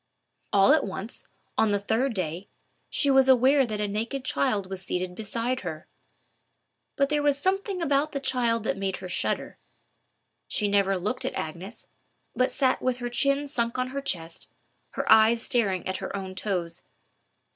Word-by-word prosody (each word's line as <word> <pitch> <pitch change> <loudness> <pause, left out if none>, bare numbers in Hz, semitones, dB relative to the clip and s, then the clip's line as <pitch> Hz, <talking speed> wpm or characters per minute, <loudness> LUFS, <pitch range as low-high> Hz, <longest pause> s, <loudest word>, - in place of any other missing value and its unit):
All 200 +8 +6
at 310 - +3
once, 200 +3 -6 0.3
on 220 - +4
the 205 - +2
third 225 +5 0
day, 180 +1 -3 0.4
she 285 - +2
was 265 0 +5
aware 265 +1 +5
that 215 -2 -4
a 210 - 0
naked 230 +6 -3
child 190 - 0
was 190 -1 -5
seated 180 0 -2
beside 230 +5 -2
her. 160 -1 -7 1.1
But 275 0 +2
there 300 0 +1
was 290 -1 +2
something 380 +2 -1
about 285 0 +1
the 280 - -3
child 240 -4 0
that 220 - -1
made 195 -1 -2
her 185 - -7
shudder. 180 - -2 0.9
She 210 - +1
never 200 -1 +2
looked 210 +8 -2
at 260 - -3
Agnes, 180 +8 -6 0.5
but 255 0 +2
sat 260 -2 +1
with 255 -1 0
her 245 -1 -5
chin 275 +3 +2
sunk 235 -4 -1
on 255 0 -1
her 275 +1 -4
chest, 170 -10 -4
and - - -31
her - - 0
eyes 220 +1 +6
staring 200 -8 0
at 185 0 -2
her - - -5
own 190 -1 -5
toes. 185 -3 -3
230 Hz, 175 wpm, -26 LUFS, 195-265 Hz, 1.1 s, All